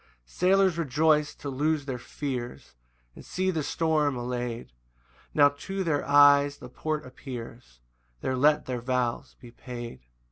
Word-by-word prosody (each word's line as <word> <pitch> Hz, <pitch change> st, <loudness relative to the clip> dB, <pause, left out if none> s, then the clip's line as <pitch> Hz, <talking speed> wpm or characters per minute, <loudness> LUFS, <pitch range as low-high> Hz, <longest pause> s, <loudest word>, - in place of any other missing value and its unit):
6 -, -, -23 dB
Sailors 190 Hz, -1 st, +3 dB
rejoice 150 Hz, 0 st, +2 dB
to -, -, -8 dB
lose 145 Hz, +2 st, 0 dB
their 130 Hz, -3 st, -4 dB
fears, 125 Hz, -, -6 dB, 0.4 s
And -, -, -12 dB
see 185 Hz, +1 st, -1 dB
the 160 Hz, -3 st, -1 dB
storm 150 Hz, -2 st, +1 dB
allay'd: 120 Hz, -, -4 dB, 0.6 s
Now 145 Hz, -1 st, +6 dB
to 190 Hz, +7 st, -5 dB
their 150 Hz, -5 st, 0 dB
eyes 145 Hz, 0 st, +6 dB
the 125 Hz, -, -11 dB
port 155 Hz, +4 st, -3 dB
appears; 120 Hz, -, -9 dB, 0.4 s
There 130 Hz, -, -1 dB
let 150 Hz, +3 st, +3 dB
their 125 Hz, -2 st, -3 dB
vows 125 Hz, -1 st, -2 dB
be 120 Hz, -, -13 dB
paid. 120 Hz, -1 st, -8 dB
145 Hz, 145 wpm, -27 LUFS, 125-155 Hz, 0.6 s, Now